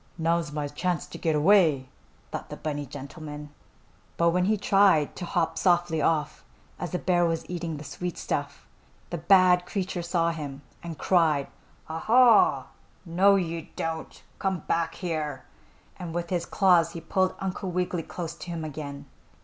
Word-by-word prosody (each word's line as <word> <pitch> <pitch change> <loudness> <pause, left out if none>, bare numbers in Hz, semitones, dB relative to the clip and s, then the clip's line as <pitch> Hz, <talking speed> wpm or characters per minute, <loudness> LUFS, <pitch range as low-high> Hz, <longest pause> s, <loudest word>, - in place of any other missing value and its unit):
"Now's 165 -1 0
my 150 -1 -2
chance 175 +5 -2
to - - -10
get 160 -2 +1
away!" 155 -5 +4 0.4
thought - - -6
the - - -7
bunny 145 -2 -4
gentleman. 150 +2 -8 0.7
But 170 0 +4
when 180 +1 +1
he 215 +2 +2
tried 195 -6 +3
to 180 - -4
hop 165 -2 0
softly 175 -3 +2
off, 155 -2 0 0.4
as 175 - -3
the 180 - -2
bear 175 -1 +2
was 165 -1 -1
eating 170 -3 -4
the 145 - -8
sweet 165 +4 -5
stuff, 145 0 -4 0.5
the 175 - -3
bad 180 0 +5
creature 185 -3 -3
saw 170 -1 +1
him 145 -4 -7 0.2
and 165 -2 -7
cried: 160 -7 +2 0.4
"Ah, 160 +1 -4
ha! 250 - +5 0.4
No 190 +4 +4
you 170 -3 -2
don't! 160 -1 -5 0.2
Come 190 -4 -1
hack 165 0 0
here!" 155 -6 -3 0.5
and 170 -2 -6
with 175 0 -3
his 175 -2 -1
claws 175 -4 +3
he 165 - -6
pulled 185 +3 0
Uncle 190 0 -3
Wiggily 180 -1 -1
close 165 0 -6
to 180 - -10
him 165 -2 -4
again. 140 -2 -7
170 Hz, 165 wpm, -27 LUFS, 155-180 Hz, 0.7 s, bad